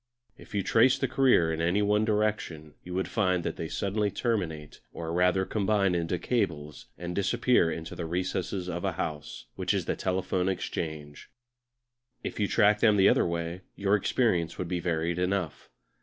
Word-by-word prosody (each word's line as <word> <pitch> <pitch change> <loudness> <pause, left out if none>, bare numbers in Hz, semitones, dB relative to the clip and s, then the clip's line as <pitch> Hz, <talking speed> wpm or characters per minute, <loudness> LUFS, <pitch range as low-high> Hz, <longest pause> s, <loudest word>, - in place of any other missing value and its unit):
If 110 - -12
you 100 - +1
traced 120 +6 +4
their 135 - +2
career 120 -12 +3
in 85 +6 +1
one 105 +1 +2
direction 105 -8 -1
you 90 0 -7
would 95 - -1
find 90 -5 +1
that - - -3
they 80 - -4
suddenly 100 +4 -1
terminate, 90 - -3
or 80 0 -5
rather 90 +2 +2
combine 100 -2 +1
into 85 0 -1
cables, 80 - -2
and 90 0 -5
disappear 100 -1 +2
into 80 0 -6
the 85 - -5
recesses 90 +1 -2
of 85 -1 -4
a 95 -3 0
house, 75 -8 -5
which - - 0
is - - -1
the - - -1
Telephone 95 0 -1
Exchange. 80 -5 -5 0.9
If - - -5
you 105 - +2
tracked 105 +2 +3
them 105 -3 +5
the 95 - +6
other - - +3
way 85 +1 -3
your 100 0 0
experience 95 -5 +1
would 90 - -3
be 90 0 -2
varied 85 0 -1
enough. 90 -3 -2
90 Hz, 170 wpm, -28 LUFS, 85-100 Hz, 0.9 s, the